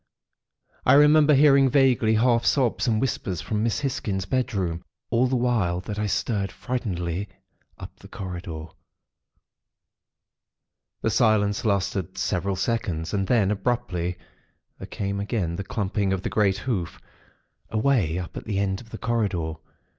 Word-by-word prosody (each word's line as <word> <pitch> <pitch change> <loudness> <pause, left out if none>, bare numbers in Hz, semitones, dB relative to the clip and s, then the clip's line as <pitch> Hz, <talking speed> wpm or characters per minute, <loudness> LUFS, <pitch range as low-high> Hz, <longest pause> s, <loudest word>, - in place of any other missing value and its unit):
I - - +5
remember 150 +1 +6
hearing 140 -1 +6
vaguely, 125 -5 +3
half 115 +1 +3
sobs 125 -3 +1
and 110 -2 +2
whispers 110 - -2
from 105 -1 -2
Miss 115 +4 0
Hisgins' 100 -8 -2
bedroom, 95 -8 -1 0.3
all 120 +2 +3
the 130 - 0
while 115 -8 +1
that 105 +2 -5
I 105 - 0
stared, 100 -2 -1
frightenedly, 100 -7 -3 0.5
up - - -11
the - - -13
corridor. 85 -4 -6 2.4
"The 110 - +1
silence 105 -3 +2
lasted 95 -2 -1
several 95 0 -1
seconds; 95 -5 -2
and 95 -2 0
then, 105 -4 +3
abruptly, 95 -5 -1 0.6
there - - -7
came 100 0 -3
again 100 -5 -2
the 100 - -4
clumping 100 -1 -1
of 95 -1 -3
the - - -2
great 100 -3 +2
hoof, 100 -8 -3 0.7
away 110 - +1
up 90 -1 -6
at - - -7
the 105 -3 -2
end 95 -1 -1
of 115 - -16
the 110 - -7
corridor. 100 -10 -1
105 Hz, 140 wpm, -25 LUFS, 95-120 Hz, 2.4 s, remember